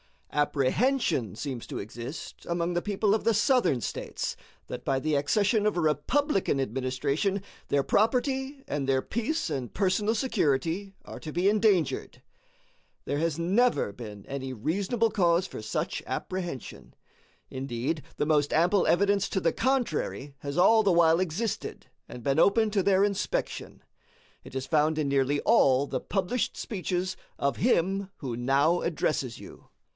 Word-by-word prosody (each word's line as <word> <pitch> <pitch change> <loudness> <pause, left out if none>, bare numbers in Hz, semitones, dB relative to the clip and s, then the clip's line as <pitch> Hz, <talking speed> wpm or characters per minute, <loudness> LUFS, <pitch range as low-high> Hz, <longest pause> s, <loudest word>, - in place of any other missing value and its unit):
Apprehension 150 - +1
seems 130 -1 -5
to - - -5
exist 120 +8 -8
among 170 0 0
the 175 - 0
people 205 +1 +1
of 220 - 0
the 230 - +4
Southern 205 - +3
States - - -4 0.3
that - - -7
by 135 - +1
the 155 +3 -1
accession 205 - +2
of 210 - +2
a 175 - 0
Republican 185 - +1
administration 135 - -1 0.2
their 140 -1 +2
property 265 - 0
and 140 -2 -3
their 135 -1 +2
peace 235 - -2
and 130 -5 -4
personal 205 +3 +1
security 195 - 0
are - - -8
to 155 - -7
be 180 +3 +3
endangered. 205 -5 +1 0.8
There 145 - -1
has 165 -1 0
never 190 - +2
been 105 -2 -9
any 135 -1 -5
reasonable 200 - 0
cause 175 -1 +2
for - - -7
such 110 - -3
apprehension. 175 -9 -5 0.6
Indeed, 135 +3 -3
the - - 0
most 150 -2 +2
ample 180 +5 +3
evidence 200 +2 +3
to 190 - -1
the 165 - +2
contrary 230 - -1
has 140 +2 -5
all 220 +5 +6
the 200 -4 +3
while 165 -1 +5
existed 185 +5 -3 0.2
and 120 - -9
been 140 +4 +1
open 215 +4 +4
to 200 -1 +2
their 195 +1 +3
inspection. 200 -1 -2 0.6
It - - -11
is 130 0 -2
found 155 +3 +2
in 150 -3 0
nearly 140 +1 +1
all 140 - +4
the - - -3
published 200 +5 -1
speeches 185 -2 -3 0.2
of 140 - 0
him 195 -3 +1
who 125 -5 -4
now 140 +7 +2
addresses 150 -7 -1
you. - - -13
170 Hz, 150 wpm, -28 LUFS, 140-205 Hz, 0.8 s, all